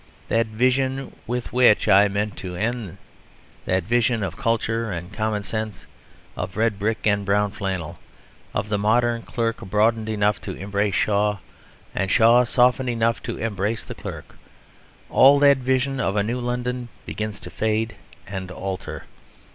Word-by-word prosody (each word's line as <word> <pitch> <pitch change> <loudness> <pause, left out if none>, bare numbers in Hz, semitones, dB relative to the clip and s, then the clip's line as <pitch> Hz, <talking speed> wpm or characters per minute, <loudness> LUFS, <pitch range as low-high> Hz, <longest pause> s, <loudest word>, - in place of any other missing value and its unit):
That 115 0 +2
vision 130 +4 0
with 125 +1 -3
which 125 -4 +5
I 100 +2 +6
meant 100 0 -2
to 90 -1 -6
end, 110 -2 -3 0.7
that 95 0 +1
vision 115 +1 +1
of 100 - -3
culture 115 -3 -1
and 90 +2 -6
common 110 -1 -1
sense, 110 -2 -4 0.5
of 95 - -5
red 110 -2 +1
brick 110 +2 -1
and 100 -1 +2
brown 100 +1 +1
flannel, 95 -6 -4 0.5
of 100 - -2
the 105 -1 0
modern 115 +3 +2
clerk 115 -1 -2
broadened 110 +3 +1
enough 105 -2 +1
to - - -5
embrace 100 +1 -1
Shaw 105 +2 +2 0.6
and 95 0 -1
Shaw 120 +3 +6
softened 125 +1 +3
enough 115 -2 +1
to - - -5
embrace 110 0 -2
the - - -7
clerk, - - -9 0.7
all 140 +2 +6
that 140 -1 +6
vision 130 +1 0
of 100 -5 0
a 105 - +2
new 120 +4 -2
London 125 0 -3 0.2
begins 105 -1 -4
to - - -9
fade 110 +1 -1 0.3
and 95 -2 -6
alter. 95 +1 -5
110 Hz, 155 wpm, -23 LUFS, 100-120 Hz, 0.7 s, I